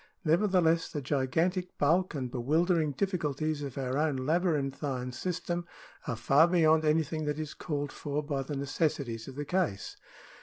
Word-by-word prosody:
Nevertheless 170 Hz, -1 st, +3 dB
the 150 Hz, -, -3 dB
gigantic 160 Hz, +7 st, 0 dB
bulk 165 Hz, +4 st, +2 dB
and 130 Hz, -3 st, -3 dB
bewildering 155 Hz, +5 st, +1 dB
difficulties 155 Hz, -3 st, -1 dB
of 140 Hz, -1 st, -6 dB
our 130 Hz, +1 st, -1 dB
own 155 Hz, -2 st, +1 dB
labyrinthine 140 Hz, -4 st, -1 dB
system 175 Hz, +4 st, -3 dB, 0.4 s
are 120 Hz, -, -1 dB
far 140 Hz, +8 st, +5 dB
beyond 160 Hz, -3 st, +4 dB
anything 155 Hz, 0 st, +1 dB
that 150 Hz, 0 st, -1 dB
is 155 Hz, -1 st, -4 dB
called 145 Hz, -2 st, -3 dB
for 145 Hz, +1 st, -3 dB
by 145 Hz, -2 st, -2 dB
the 145 Hz, +2 st, -5 dB
necessities 140 Hz, -5 st, -2 dB
of 135 Hz, -, -8 dB
the 145 Hz, +1 st, -4 dB
case. 175 Hz, -, -1 dB
150 Hz, 150 wpm, -30 LUFS, 135-165 Hz, 0.4 s, far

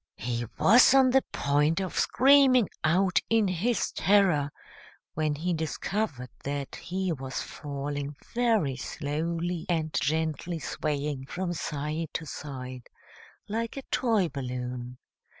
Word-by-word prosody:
He 120 Hz, +1 st, -3 dB
was 245 Hz, +5 st, +7 dB
on 260 Hz, -1 st, +6 dB
the 265 Hz, +1 st, +5 dB
point 145 Hz, +4 st, +2 dB
of 190 Hz, -2 st, -3 dB
screaming 265 Hz, -4 st, +5 dB, 0.2 s
out 180 Hz, +3 st, +3 dB
in 225 Hz, -2 st, +3 dB
his 190 Hz, +7 st, 0 dB
terror, 180 Hz, -7 st, +3 dB, 0.6 s
when 155 Hz, -1 st, 0 dB
he 175 Hz, +4 st, -1 dB
discovered 160 Hz, -, -3 dB
that 140 Hz, -1 st, -4 dB
he 185 Hz, +1 st, -3 dB
was 135 Hz, -2 st, -4 dB
falling 145 Hz, 0 st, -5 dB, 0.2 s
very 225 Hz, -, +2 dB
slowly 165 Hz, +5 st, -3 dB
and 160 Hz, -3 st, 0 dB
gently 160 Hz, +2 st, -1 dB
swaying 145 Hz, -3 st, -3 dB
from 180 Hz, +1 st, -3 dB
side 155 Hz, 0 st, -3 dB
to 165 Hz, -, -3 dB
side, 130 Hz, -4 st, -7 dB, 0.6 s
like 225 Hz, +4 st, -3 dB
a 275 Hz, -, -5 dB
toy 225 Hz, -7 st, +2 dB
balloon. 125 Hz, -3 st, -5 dB
160 Hz, 120 wpm, -28 LUFS, 140-195 Hz, 0.6 s, was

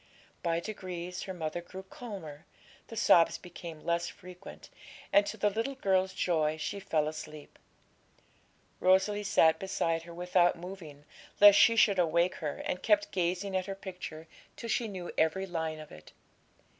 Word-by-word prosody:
By 170 Hz, -1 st, 0 dB
degrees 180 Hz, -2 st, -6 dB
her 190 Hz, -, -5 dB
mother 160 Hz, 0 st, -4 dB
grew 185 Hz, +2 st, -10 dB
calmer, 190 Hz, -8 st, -9 dB, 0.4 s
the 225 Hz, -, -9 dB
sobs 175 Hz, -6 st, +5 dB
became 170 Hz, -3 st, -10 dB
less 170 Hz, 0 st, 0 dB
frequent, 185 Hz, 0 st, -12 dB, 0.4 s
and, 205 Hz, 0 st, +5 dB
to 220 Hz, -, -5 dB
the 210 Hz, 0 st, +2 dB
little 230 Hz, +6 st, -2 dB
girl's 190 Hz, -6 st, +1 dB
joy, 155 Hz, -3 st, +1 dB
she 160 Hz, +5 st, -4 dB
fell 155 Hz, -5 st, 0 dB
asleep. 155 Hz, -1 st, -8 dB, 1.2 s
Rosalie 190 Hz, +3 st, +3 dB
sat 160 Hz, -5 st, +4 dB
beside 165 Hz, -4 st, -1 dB
her 170 Hz, +1 st, -11 dB
without 175 Hz, 0 st, +2 dB
moving, 165 Hz, -5 st, -10 dB, 0.3 s
lest 205 Hz, 0 st, +9 dB
she 230 Hz, -, +6 dB
should 200 Hz, -4 st, +4 dB
awake 170 Hz, +1 st, +2 dB
her, 150 Hz, -4 st, -4 dB
and 180 Hz, -, -2 dB
kept 205 Hz, -1 st, +2 dB
gazing 185 Hz, +2 st, -1 dB
at 185 Hz, 0 st, -1 dB
her 195 Hz, -, -4 dB
picture 180 Hz, -5 st, -8 dB, 0.3 s
till 230 Hz, -, -7 dB
she 230 Hz, +1 st, 0 dB
knew 185 Hz, -4 st, -6 dB
every 160 Hz, +5 st, +1 dB
line 160 Hz, -3 st, -3 dB
of 155 Hz, -, -11 dB
it. 75 Hz, -, -14 dB
180 Hz, 155 wpm, -30 LUFS, 165-195 Hz, 1.2 s, lest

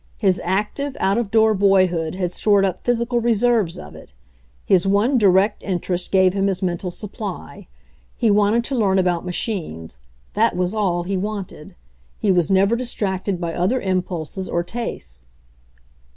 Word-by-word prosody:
His 190 Hz, -4 st, +1 dB
active, 210 Hz, +10 st, -2 dB
out 195 Hz, +4 st, +2 dB
of 230 Hz, -4 st, -2 dB
door 220 Hz, 0 st, +4 dB
boyhood 185 Hz, -5 st, +2 dB
had 180 Hz, -2 st, -2 dB
stored 200 Hz, +1 st, +3 dB
up 185 Hz, -2 st, -3 dB
physical 240 Hz, 0 st, 0 dB
reserves 230 Hz, -5 st, +1 dB
of -, -, -10 dB
it; 60 Hz, -, -15 dB, 0.5 s
his 185 Hz, 0 st, +3 dB
one 215 Hz, +7 st, +2 dB
direct 200 Hz, +1 st, +3 dB
interest 180 Hz, -1 st, -3 dB
gave 185 Hz, -1 st, +4 dB
him 195 Hz, 0 st, +1 dB
his 190 Hz, -1 st, -2 dB
mental 180 Hz, 0 st, -2 dB
supply. 200 Hz, -, -7 dB, 0.5 s
He 225 Hz, -, +2 dB
wanted 210 Hz, +3 st, +3 dB
to 270 Hz, -, -3 dB
learn 200 Hz, -5 st, +2 dB
about 180 Hz, -1 st, 0 dB
machines; 155 Hz, -, -4 dB, 0.3 s
that -, -, +2 dB
was 180 Hz, +2 st, -1 dB
all 185 Hz, -5 st, 0 dB
he 190 Hz, +2 st, -2 dB
wanted. 200 Hz, -5 st, -6 dB, 0.4 s
He 205 Hz, -, +1 dB
was 175 Hz, -4 st, +2 dB
never 195 Hz, +3 st, +3 dB
distracted 200 Hz, -6 st, -2 dB
by 170 Hz, -1 st, -3 dB
other 185 Hz, +10 st, 0 dB
impulses 185 Hz, -2 st, -3 dB
or 170 Hz, -, 0 dB
tastes. 70 Hz, -, -6 dB
195 Hz, 155 wpm, -21 LUFS, 180-215 Hz, 0.5 s, door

